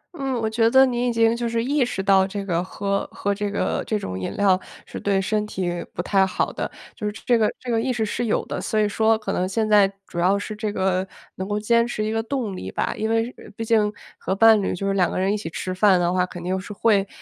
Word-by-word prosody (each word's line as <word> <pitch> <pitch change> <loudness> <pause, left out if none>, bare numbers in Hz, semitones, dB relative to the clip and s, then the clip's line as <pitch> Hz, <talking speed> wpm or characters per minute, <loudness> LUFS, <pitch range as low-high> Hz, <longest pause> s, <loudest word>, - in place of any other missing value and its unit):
嗯， 270 -5 -2
我 225 - 0
觉 225 +1 +2
得 265 +2 +7
你 245 -1 0
已 - - +1
经 230 0 +3
就 235 0 -2
是 230 0 0
意 280 +2 +2
识 235 -5 -2
到 190 -1 +5
这 200 0 -5
个 175 -2 0
喝 200 +1 -2
喝 200 - -1
这 205 0 -2
个 200 - -1
这 215 - 0
种 95 - -5
饮 95 - -3
料 195 -2 +4 0.3
是 - - -7
对 200 -1 +1
身 210 +2 0
体 175 -4 -3
不 175 - -4
太 195 0 +3
好 190 - -1
的， - - -3 0.3
就 210 - -4
是 210 - -3
这 245 - +4
个 220 -2 +2
这 250 - -5
个 225 -1 +2
意 255 - 0
识 235 -3 0
是 235 +3 -2
有 215 - 0
的， - - -4
所 215 - -1
以 210 - +3
说， 220 +1 +2
可 215 - -4
能 185 +1 -1
现 220 +2 0
在 205 -2 +5
主 175 - -6
要 185 +3 +3
是 215 +1 -5
这 215 0 -3
个 190 -1 0 0.3
能 190 +2 -5
够 205 - 0
坚 235 +2 +2
持 215 -3 -2
一 215 - -1
个 225 0 0
动 225 -4 -3
力 95 - -6
吧。 - - -1
因 220 - -2
为 225 0 +2
是 245 - -11
毕 225 - -3
竟 215 -2 +3 0.3
和 190 - -2
伴 220 0 +6
侣 190 - -1
就 195 +2 -3
是 195 - +1
2 180 -3 +2
个 - - -4
人 190 +2 +1
一 210 - 0
起 185 -6 -6
吃 185 +2 -4
饭 185 -1 +4
的 175 0 +1
话， 180 0 +1
肯 175 -1 -9
定 185 +1 -1
是 195 - -9
会， 200 -1 +2
210 Hz, 295 characters per minute, -23 LUFS, 190-225 Hz, 0.3 s, 得